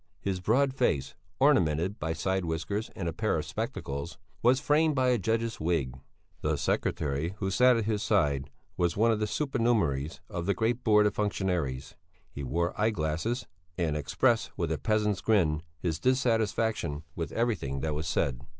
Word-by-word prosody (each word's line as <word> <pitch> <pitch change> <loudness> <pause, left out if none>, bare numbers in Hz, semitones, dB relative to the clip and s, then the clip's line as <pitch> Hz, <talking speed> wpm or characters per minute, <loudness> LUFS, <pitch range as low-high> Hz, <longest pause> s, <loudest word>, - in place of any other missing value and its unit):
His 95 -2 -2
broad 130 +8 +2
face, 75 - 0 0.3
ornamented 80 +6 +3
by 80 +1 -1
side 95 +3 -1
whiskers 90 +7 -2
and 85 - -3
a 85 - -2
pair - - 0
of - - -3
spectacles, 70 +4 -4 0.2
was 125 +2 +4
framed 150 +1 +2
by 130 -1 +3
a 125 -2 +2
judge's 115 +3 -1
wig. 80 -6 0 0.5
The - - 0
secretary 75 +5 -1
who 95 -2 -2
sat 125 +3 +5
at 115 - -1
his 105 -2 0
side 70 -11 +1 0.3
was 85 -1 +1
one 115 +2 +4
of 110 - 0
the 105 - 0
supernumeraries 115 - 0
of 85 +1 -4
the 100 - +2
great 115 +5 0
Board 105 -2 +5
of 105 - +2
Functionaries; 90 -10 -1 0.4
he 70 - -7
wore 85 +7 -1
eye 110 - +4
glasses 90 - -2 0.3
and 80 -4 0
expressed 75 - +1
with 85 -4 -1
a 80 - -1
peasant's 105 -2 +1
grin 85 -9 +2 0.2
his 80 -2 -2
dissatisfaction 115 - +1
with 80 - -4
everything 100 - -1
that 75 +1 -1
was 80 +3 -3
said. 70 -6 0
95 Hz, 170 wpm, -29 LUFS, 80-115 Hz, 0.5 s, sat